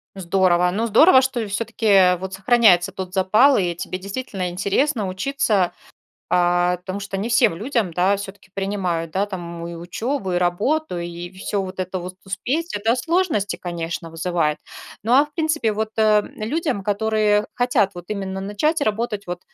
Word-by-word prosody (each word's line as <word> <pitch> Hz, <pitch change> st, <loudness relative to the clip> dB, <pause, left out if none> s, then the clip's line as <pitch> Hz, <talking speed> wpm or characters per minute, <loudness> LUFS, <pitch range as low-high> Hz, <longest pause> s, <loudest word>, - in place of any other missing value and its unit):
Здорово. 180 Hz, -1 st, +2 dB
Ну, 225 Hz, +4 st, -1 dB
здорово, 260 Hz, -, +7 dB
что 245 Hz, -4 st, -2 dB
всё-таки, 220 Hz, +2 st, -4 dB
э, 185 Hz, -3 st, +5 dB
вот 190 Hz, +1 st, -6 dB
сохраняется 195 Hz, -3 st, +4 dB
тот 185 Hz, -1 st, -7 dB
запал 210 Hz, +9 st, +4 dB
и 175 Hz, -3 st, 0 dB
тебе 185 Hz, +2 st, -5 dB
действительно 195 Hz, -2 st, -4 dB
интересно 200 Hz, +5 st, 0 dB
учиться, 195 Hz, -2 st, 0 dB, 0.6 s
а, 175 Hz, 0 st, +2 dB
потому 185 Hz, +2 st, -6 dB
что 200 Hz, -1 st, -5 dB
не 215 Hz, +5 st, -3 dB
всем 235 Hz, -6 st, +4 dB
людям, 220 Hz, -, -1 dB
да, 185 Hz, +3 st, +3 dB
всё-таки 200 Hz, -1 st, -9 dB
принимают, 185 Hz, -5 st, -2 dB
да, 195 Hz, +2 st, +1 dB
там 170 Hz, -4 st, -7 dB
и 170 Hz, -, -7 dB
учёбу, 190 Hz, +5 st, -3 dB
и -, -, +1 dB
работу, 180 Hz, -, 0 dB
и 175 Hz, 0 st, -6 dB
всё 195 Hz, +1 st, -3 dB
вот 185 Hz, 0 st, -6 dB
это 185 Hz, 0 st, -3 dB
вот 180 Hz, +1 st, -8 dB
успеть. 265 Hz, -, -2 dB
Это 225 Hz, +3 st, +1 dB
сложности, 325 Hz, -, 0 dB
конечно, 170 Hz, -1 st, -5 dB
вызывает. 165 Hz, -2 st, -1 dB, 0.4 s
Но, 230 Hz, +4 st, +2 dB
а -, -, +3 dB
в 295 Hz, -, -17 dB
принципе, 310 Hz, -9 st, 0 dB
вот, 215 Hz, +1 st, -2 dB
э, 220 Hz, -, +3 dB, 0.2 s
м, -, -, -10 dB
людям, 270 Hz, -, -1 dB
которые 210 Hz, 0 st, +1 dB
хотят 245 Hz, -6 st, +1 dB
вот 175 Hz, -, -8 dB
именно 195 Hz, -2 st, -3 dB
начать 285 Hz, +11 st, 0 dB
работать 215 Hz, -2 st, -2 dB
вот 175 Hz, 0 st, -5 dB
195 Hz, 170 wpm, -21 LUFS, 180-225 Hz, 0.6 s, здорово